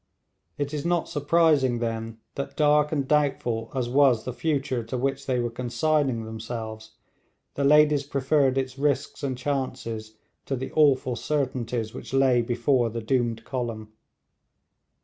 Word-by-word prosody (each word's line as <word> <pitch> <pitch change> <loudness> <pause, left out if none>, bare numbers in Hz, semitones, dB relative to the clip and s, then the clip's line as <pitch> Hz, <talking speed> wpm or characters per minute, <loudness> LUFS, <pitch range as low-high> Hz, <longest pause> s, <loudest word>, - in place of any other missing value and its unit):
It 145 0 -3
is 145 -2 -2
not 175 0 0
surprising, 145 -4 +2
then, 115 -1 -3 0.2
that 140 - -5
dark 150 0 +4
and 140 -4 -1
doubtful 130 -6 0
as 125 -2 0
was 130 -3 +4
the 125 - -4
future 140 -4 -1
to 115 +3 -4
which 135 +2 -2
they 130 -2 +1
were 120 -1 -1
consigning 130 0 0
themselves, 110 -1 -7 0.6
the 140 - -2
ladies 150 0 +5
preferred 140 -1 +1
its 130 0 -2
risks 145 -1 0
and 135 -3 -2
chances 125 -5 -4 0.3
to 135 - -1
the 130 +1 -5
awful 135 -5 +3
certainties 120 -4 -2
which - - -6
lay 130 -3 +4
before 120 +1 +1
the 115 +1 -4
doomed 120 -2 0
column. 115 -4 -4
130 Hz, 145 wpm, -26 LUFS, 115-145 Hz, 0.6 s, ladies